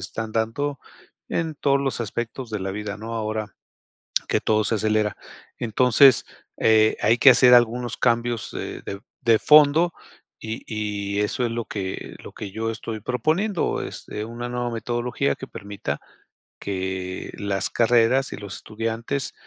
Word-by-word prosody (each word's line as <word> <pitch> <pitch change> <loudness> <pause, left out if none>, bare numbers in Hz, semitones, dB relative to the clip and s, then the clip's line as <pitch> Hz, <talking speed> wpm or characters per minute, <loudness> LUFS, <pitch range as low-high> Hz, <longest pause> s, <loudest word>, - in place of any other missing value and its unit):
están 110 -1 -5
dando 125 +6 -1 0.5
en 160 -2 -1
todos 140 -1 +2
los 135 -3 -2
aspectos 120 +3 -5
de 105 -2 -3
la 95 0 -3
vida, 105 0 -5
¿no? 115 +1 -6
Ahora 110 -2 -3 0.8
que - - +2
todo 110 0 +2
se 115 - 0
acelera. 110 -1 +1 0.4
Entonces, 125 +3 +5 0.3
eh, 110 -1 +4
hay 115 +3 +4
que 135 - +8
hacer 125 0 +7
algunos 120 0 +3
cambios 120 -1 0
de - - -6
de 100 +1 -6 0.2
de 115 -2 +4
fondo, 155 +3 +6 0.5
y 110 +1 -6
y 105 -2 -3
eso 115 +4 -1
es 115 - -2
lo 115 -1 -3
que 95 -2 -5
lo - - -9
que 100 -3 -7
yo 115 +2 -2
estoy 110 -1 -6
proponiendo, 160 - 0
es - - -7
una 115 +3 -5
nueva 120 -1 -2
metodología 120 +4 -1
que 130 - -8
permita 100 -4 -5 0.6
que 95 -1 -4
las 100 -1 -1
carreras, 120 +3 +3
y - - -6
los 100 -3 -7
estudiantes 115 +5 -3
115 Hz, 150 wpm, -24 LUFS, 105-125 Hz, 0.8 s, que